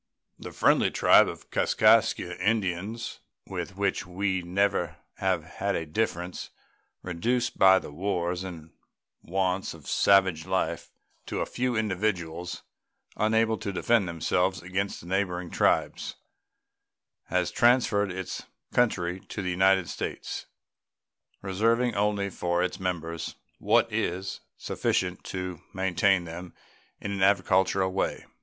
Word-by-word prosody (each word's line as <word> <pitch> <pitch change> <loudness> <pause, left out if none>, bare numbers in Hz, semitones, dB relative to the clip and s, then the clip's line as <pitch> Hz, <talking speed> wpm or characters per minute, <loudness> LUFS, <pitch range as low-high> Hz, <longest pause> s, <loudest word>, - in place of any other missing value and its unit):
The - - -8
friendly - - +3
tribe - - +6
of - - -8
Kaskaskia - - +3
Indians, 105 +1 -1 0.3
with - - -6
which - - 0
we 95 +1 -1
have 85 - -9
never 95 -2 +1 0.2
had - - -1
a 80 - -2
difference, 90 +1 -2 0.5
reduced 120 +8 -1
by 95 0 +8
the 75 - -5
wars 90 +1 -2
and 80 -4 -8 0.5
wants 95 0 -1
of 75 -4 -15
savage 95 -4 +3
life 90 -3 -1 0.4
to - - -2
a - - 0
few 125 0 -1
individuals 90 -5 -2 0.5
unable 110 +1 +2
to 105 -2 -3
defend 105 +1 +2
themselves 90 +3 0
against 95 +2 -2
the - - -13
neighboring 90 -1 -1
tribes, - - +1 1.1
has 90 -1 0
transferred 120 -5 +3
its 95 0 -5 0.3
country 95 -7 +1
to 100 +1 -6
the 90 - -1
United 95 0 +3
States, - - -5 1.0
reserving 115 +5 +1
only 100 -1 0
for 85 0 0
its 90 - -3
members 85 -3 -3 0.2
what - - +3
is 95 +2 -2 0.2
sufficient 90 -1 -1
to 90 -2 -5
maintain 95 0 +2
them 85 +1 -8 0.4
in 100 - -4
an 100 -1 -3
agricultural 95 -1 +3
way. 95 - -1
95 Hz, 120 wpm, -27 LUFS, 90-100 Hz, 1.1 s, by